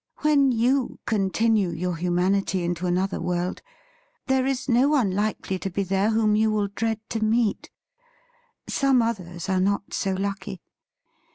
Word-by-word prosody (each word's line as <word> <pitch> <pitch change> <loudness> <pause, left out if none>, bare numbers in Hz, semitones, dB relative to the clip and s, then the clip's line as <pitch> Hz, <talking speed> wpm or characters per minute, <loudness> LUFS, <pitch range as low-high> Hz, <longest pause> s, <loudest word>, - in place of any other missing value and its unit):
When 285 -3 +4
you 245 +3 +1
continue 215 -1 +1
your 180 0 -3
humanity 180 +2 0
into 175 +1 -2
another 185 +2 -1
world, 180 +1 -2 0.6
there 265 -1 +1
is 270 -1 -2
no 255 +2 +4
One 260 -10 +2
likely 200 -1 -2
to 195 - -3
be 195 +2 -2
there 195 +2 +1
whom 220 -1 +2
you 220 +1 +3
will 210 -2 0
dread 225 +2 -2
to 225 -1 -1
meet. 220 -1 +1 1.0
Some 270 -4 +2
others 180 -6 -4
are 190 -1 +1
not 200 +1 -1
so 195 -1 -1
lucky. 195 0 -4
200 Hz, 150 wpm, -24 LUFS, 185-230 Hz, 1.0 s, When